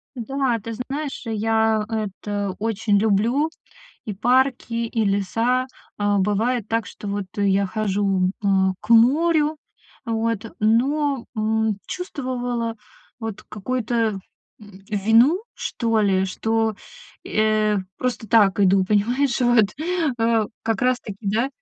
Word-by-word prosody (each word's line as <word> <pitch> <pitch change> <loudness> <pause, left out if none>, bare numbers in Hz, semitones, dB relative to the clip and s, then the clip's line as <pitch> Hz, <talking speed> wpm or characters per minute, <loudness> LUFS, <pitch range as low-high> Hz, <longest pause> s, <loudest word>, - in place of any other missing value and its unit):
Да, 255 0 -1
ты 230 +2 -6
знаешь, 270 +5 -5
я 220 0 +1
это 205 -2 -3
очень 215 -1 +1
люблю: 225 +9 +2 0.6
и 215 - -4
парки, 250 +3 +1
и 230 -1 -1
леса. 225 +6 +1 0.3
А 205 0 +2
бывает 210 +3 0
так, 225 -3 0
что 205 - -8
вот 200 -1 -3
я 200 -1 +2
хожу, 195 -2 0
э, - - +1 0.3
к 215 - -13
морю, 300 +6 +4 0.5
вот, 225 -1 -2
но, 265 +5 +2
м, 220 -1 0
чувствовала, 245 -9 -3 0.4
вот, 220 -3 -6
какую-то, 240 +3 -3 0.7
м, 205 -2 -14
вину, 225 - +4
что 225 -2 -1
ли, 190 -2 +2
что, 225 +3 0 0.5
э, 215 -1 +1 0.2
просто 250 -3 -3
так 205 -3 +4
иду, 190 -1 +4
понимаешь, 240 +7 +1
вот, 240 -4 +3 0.4
э, 225 -1 +2 0.2
как 225 -1 -1
раз 255 -1 +2
таки, 205 -3 -8
да. 220 +5 0
225 Hz, 120 wpm, -22 LUFS, 205-245 Hz, 0.7 s, морю